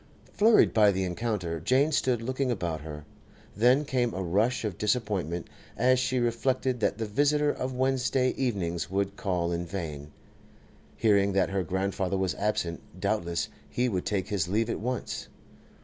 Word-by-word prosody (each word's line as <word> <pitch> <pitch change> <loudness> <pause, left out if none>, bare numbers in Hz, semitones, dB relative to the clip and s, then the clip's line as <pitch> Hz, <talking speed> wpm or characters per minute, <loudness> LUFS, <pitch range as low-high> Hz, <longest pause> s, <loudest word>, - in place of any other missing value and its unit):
Flurried 220 +1 +5
by 105 -2 +6
the 95 0 -1
encounter, 90 -3 -2
Jane 135 - +2
stood 125 -5 +1
looking 130 +2 -1
about 85 -9 -2
her. 75 -1 -8 0.5
Then 125 +7 +4
came 125 -5 0
a 95 - -2
rush 110 +8 +1
of 100 -5 -4
disappointment 100 -7 -1 0.3
as 130 +2 +4
she 130 0 0
reflected 125 +1 0
that 105 - 0
the 115 - -2
visitor 145 +6 +2
of 130 0 -4
Wednesday 130 0 +1
evenings 85 - -2
would 100 +1 -1
call 90 -4 -1
in 85 0 -1
vain. 80 -5 -6 0.9
Hearing 100 -3 +3
that 95 -1 +2
her 95 -1 0
grandfather 95 +2 -1
was 95 -2 0
absent, 90 -5 -2 0.2
doubtless 85 0 -1 0.2
he 125 +1 0
would 95 -7 -2
take 100 -3 -1
his 95 -5 0
leave 110 +5 0
at - - -3
once. 125 +3 -3
105 Hz, 160 wpm, -28 LUFS, 90-125 Hz, 0.9 s, by